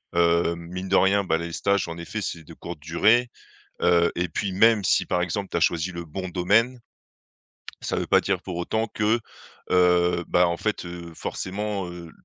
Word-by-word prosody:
heu, 85 0 +3
mine 90 +3 -7
de 95 - +3
rien, 100 +1 +3
bah, 80 -3 +1
les 85 0 -5
stages, 100 -2 +1
en 85 - -6
effet, 85 +6 -5
c'est 85 -4 -5
de 85 - -13
courte 85 0 -8
durée, 110 +11 +3 0.5
heu, 85 -1 +4
et 90 0 -1
puis 95 +4 -2
même 110 +1 +4
si, - - +3
par 90 - 0
exemple, 95 +3 -2
tu - - -1
as - - +2
choisi 85 +2 +1
le 85 -1 -6
bon 95 +4 -5
domaine, 105 +8 +2 1.0
ça - - -2
veut - - -2
pas - - +4
dire 95 -2 -1
pour 95 -1 -7
autant 110 +6 -1
que, 110 +2 +2 0.5
heu, 90 -1 +3
ben, 90 - +4
en 85 0 -1
fait, 105 +2 -2
heu, 85 -1 -8
forcément, 100 0 -4
heu, 85 -1 -9
90 Hz, 195 wpm, -25 LUFS, 85-100 Hz, 1.0 s, heu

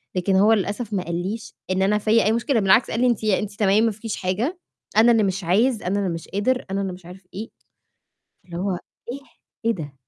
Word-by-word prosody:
لكن 185 +1 +1
هو 205 +4 +5
للأسف 210 +2 -2
ما 190 -3 0
قاليش 185 +6 -4 0.2
إن 185 0 +1
أنا 205 +2 +3
فيَّ 220 +2 +3
أي 215 - +3
مشكلة، 235 +2 +1
بالعكس 195 +4 +4
قال - - -1
لي: 250 - +4
"أنتِ 235 -3 0
أنتِ 210 0 0
تمام 205 +1 +4
ما 225 - +2
فيكيش 220 +1 -5
حاجة، 220 - -2 0.4
أنا 230 +2 +7
اللي 225 -2 +3
مش 195 -1 -1
عايز، 215 +7 +2
أنا 195 +3 0
اللي 195 -2 0
مش 165 -1 -5
قادر، 250 +6 0
أنا 195 +1 -1
اللي 190 -2 -3
مش 180 -1 -13
عارف 180 +1 -13
إيه." 220 +4 -6 0.9
فاللي 175 -1 -8
هو 195 +3 -1 0.4
إيه! 275 - -6 0.5
إيه 230 - +4
ده؟! 150 -5 -7
205 Hz, 220 wpm, -23 LUFS, 185-225 Hz, 0.9 s, أنا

